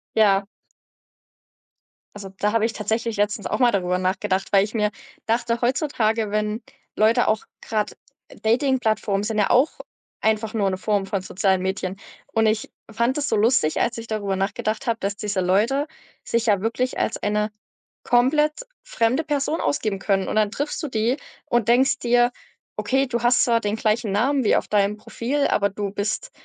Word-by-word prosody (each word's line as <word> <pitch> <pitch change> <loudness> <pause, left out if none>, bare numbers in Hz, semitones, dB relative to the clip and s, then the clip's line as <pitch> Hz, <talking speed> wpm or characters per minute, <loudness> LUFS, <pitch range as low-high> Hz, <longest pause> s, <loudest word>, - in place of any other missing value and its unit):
Ja. 200 -2 +4 1.7
Also, 200 -1 -8
da 210 - +1
habe 225 -1 +3
ich 225 - -1
tatsächlich 220 +1 -2
letztens 205 0 0
auch - - -2
mal 245 -2 +5
darüber 180 -2 0
nachgedacht. 190 +1 -1
Weil 195 -1 +5
ich 210 +3 -5
mir 210 -2 +1 0.4
dachte 230 +1 0
heutzutage, 230 -5 0
wenn 215 +1 -1 0.3
Leute 225 +3 +3
auch 215 0 +1 0.2
grad 215 -2 -2 0.5
Datingplattformen 220 -4 +1
sind 215 0 -2
ja 205 - +2
auch 255 +6 +4 0.5
einfach 220 0 0
nur 205 -3 +1
'ne 185 - -2
Form 205 0 0
von 195 -1 -2
sozialen 190 0 0
Medien. 190 0 -2 0.4
Und 225 0 +3
ich 215 0 0 0.2
fand 235 +5 0
das 290 -1 -1
so - - +2
lustig, 215 -8 +2
als 235 0 0
ich 230 0 -7
darüber 205 -3 -2
nachgedacht 215 +5 -2
habe, 230 -1 0
dass 200 +1 -2
diese 205 -1 -2
Leute 225 - +2 0.4
sich 235 0 -1
ja 200 -3 +3
wirklich 230 +3 -1
als - - 0
eine 210 +1 -1 0.5
komplett 300 - +2 0.2
fremde 260 - 0
Person 295 +2 -1
ausgeben 215 -8 -1
können. 195 -1 0
Und - - -2
dann 215 -1 +2
triffst 285 +6 -3
du - - -1
die 230 +1 +1 0.3
und 240 -3 +1
denkst 260 +3 +4
dir: 240 0 +3 0.5
„Okay, 270 +1 +1
du 235 -2 -2
hast 245 0 +4
zwar 230 -1 +2
den 205 +1 -1
gleichen 215 -1 0
Namen 260 +7 +2
wie 215 - +3
auf - - -2
deinem 210 0 +1
Profil, 265 +6 -1
aber 200 0 +2
du 200 0 -4
bist 210 - -3
220 Hz, 175 wpm, -23 LUFS, 205-240 Hz, 1.7 s, mal